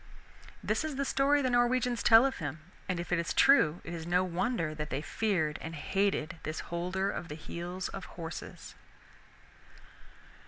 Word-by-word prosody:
This - - 0
is 310 -3 -3
the 275 +1 -1
story 280 +2 +3
the 255 - +1
Norwegians 245 0 +2
tell 225 +2 +7
of 270 - -1
him, 155 0 -5 0.3
and 180 -2 -1
if 175 - -6
it 175 - +2
is 170 - -2
true 180 - +5
it 170 - -7
is 165 -1 -6
no 180 +1 +3
wonder 180 -2 -1
that 150 0 -5
they 135 - -2
feared 160 -2 -1
and 160 +1 -6
hated 170 0 -1
this 155 +1 -4
Holder 185 +3 -1
of 175 - -5
the 150 - -6
Heels 175 +4 -5
of 195 - -7
Horses. 165 -2 -8
180 Hz, 170 wpm, -31 LUFS, 160-240 Hz, 0.3 s, tell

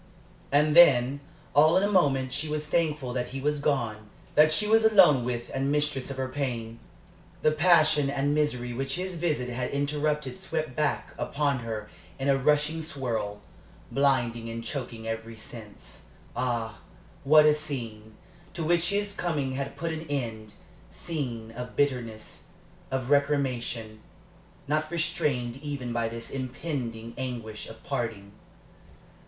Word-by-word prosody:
And 150 +2 +3
then, 140 -5 +7 0.3
all 155 +4 +6
in 190 - +3
a - - +3
moment, 135 -8 +2
she 155 +1 -2
was 150 0 -2
thankful 150 -5 0
that 125 -1 -1
he 135 - -6
was 150 +1 0
gone 115 -7 -1 0.2
that 155 +1 +6
she 210 - +2
was 225 +1 +5
alone 190 - +6
with 120 -1 -3
and 135 +1 0
mistress 150 -3 0
of 135 - -5
her 130 0 -1
pain. 120 -4 -4 0.6
The 155 - +5
passion 155 -3 +4
and 140 +1 0
misery 125 -5 0
which 135 +2 -2
his 180 0 -4
visit 150 -7 -1
had 125 +1 -2
interrupted 145 -1 -1
swept 155 -5 -3
back 150 -1 -1
upon 140 -2 0
her 110 -2 -5 0.3
in 135 +1 -1
a 135 - +4
rushing 150 +3 +2
swirl, 115 -9 -3 0.5
blinding 120 -4 +1
and 115 0 -5
choking 120 -4 -5
every 115 0 -5
sense. 105 -1 -12 0.3
Ah, 115 -5 -2 0.4
what 150 +2 +7
a 150 - +6
scene, 115 -8 -6 0.4
to 170 - -2
which 170 +2 +2
his 205 0 0
coming 155 -8 -1
had 135 +1 -4
put 165 0 -2
an 160 0 -5
end 115 -6 -4 0.3
scene 125 -9 -5
of 125 +2 -7
bitterness, 120 -6 -2 0.4
of 130 0 -2
recrimination, 125 -6 0 0.7
not 155 +1 0
restrained 150 -7 -1
even 140 -4 -4
by 115 -1 0
this 115 0 -7
impending 125 -4 -4
anguish 120 -4 -5
of 110 0 -12
parting! 105 -4 -3
135 Hz, 145 wpm, -28 LUFS, 120-150 Hz, 0.7 s, then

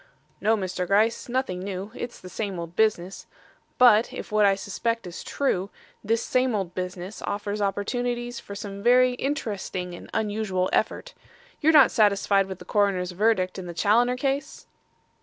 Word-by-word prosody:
"No, 220 +1 +3
Mr. 185 -2 -3
Gryce; 215 +5 +2
nothing 245 -8 -1
new. 195 +2 -5
It's 240 -1 -7
the 185 - -11
same 195 0 -4
old 170 0 -7
business. 195 -4 0 0.5
But, 235 -2 +6
if - - -7
what 210 -1 +4
I 195 - +4
suspect 230 +3 -3
is 175 -1 -7
true, 200 -9 -1 0.3
this 225 +2 0
same 255 -2 +1
old 190 -4 -3
business 180 +2 -5
offers 205 +1 -3
opportunities 240 +4 -2
for 200 - -9
some 200 -1 -7
very 250 +3 +5
interesting 205 -9 -3
and 175 - -10
unusual 205 -4 -1
effort. - - -1 0.5
You're 315 - +4
not 295 -5 +7
satisfied 200 -2 +3
with 190 -1 -6
the - - -13
coroner's 195 -3 +1
verdict 190 -1 +1
in 180 - -7
the 170 - -7
Challoner 240 +7 +3
case?" 275 +2 -2
205 Hz, 160 wpm, -25 LUFS, 185-240 Hz, 0.5 s, not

